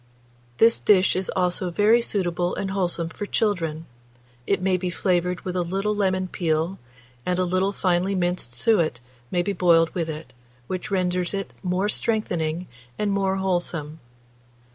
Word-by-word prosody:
This 230 +1 +5
dish 190 -4 +4
is 185 0 -1
also 180 0 0
very 210 +6 +4
suitable 175 -5 -1
and 195 -1 -3
wholesome 175 -3 -1
for 205 +5 -6
children; 165 -8 -1 0.6
it 200 - +2
may 185 0 +2
be 180 0 -2
flavoured 180 0 0
with 180 -1 -4
a 180 - +1
little 195 +4 -1
lemon 185 -2 +1
peel, 165 +1 -1 0.4
and 180 0 0
a 185 - +2
little 185 +2 +1
finely 185 0 +1
minced 175 -8 -1
suet 160 - +2 0.3
may 175 -1 +1
be 200 +2 -1
boiled 165 -3 +4
with 165 -3 -2
it, 150 -4 -7 0.3
which 185 +7 -4
renders 180 -1 0
it 195 0 -4
more 185 +1 0
strengthening 180 -7 -1 0.3
and 210 -1 0
more 195 -1 +1
wholesome. 175 -5 -2
180 Hz, 155 wpm, -24 LUFS, 175-195 Hz, 0.6 s, This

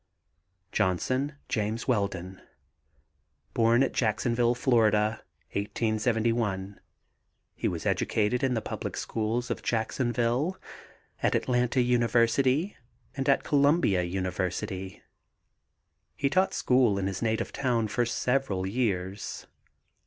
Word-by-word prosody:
JOHNSON, 130 +9 0
JAMES 110 +1 -2
WELDON. 95 -5 -1 1.1
Born 115 +2 +4
at 135 - -1
Jacksonville, 120 +1 +1
Fla., 110 -4 +2 0.3
1871. 110 -1 -1 0.7
He - - -2
was - - -3
educated 110 +3 +1
in 130 -2 +2
the 110 - -2
public - - -5
schools 115 +3 -2
of - - -3
Jacksonville, 120 - 0 0.6
at - - +2
Atlanta 125 0 +1
University 125 - +2 0.4
and 135 0 -1
at 135 - +3
Columbia 145 - +3
University. 95 +1 -3 1.1
He 140 -1 0
taught 185 +3 +2
school 125 -5 +3
in 95 - -1
his 95 -1 -3
native 110 -1 -1
town 120 -5 0
for 120 +4 0
several 120 -5 0
years. 95 -3 -2
115 Hz, 100 wpm, -28 LUFS, 100-125 Hz, 1.1 s, Born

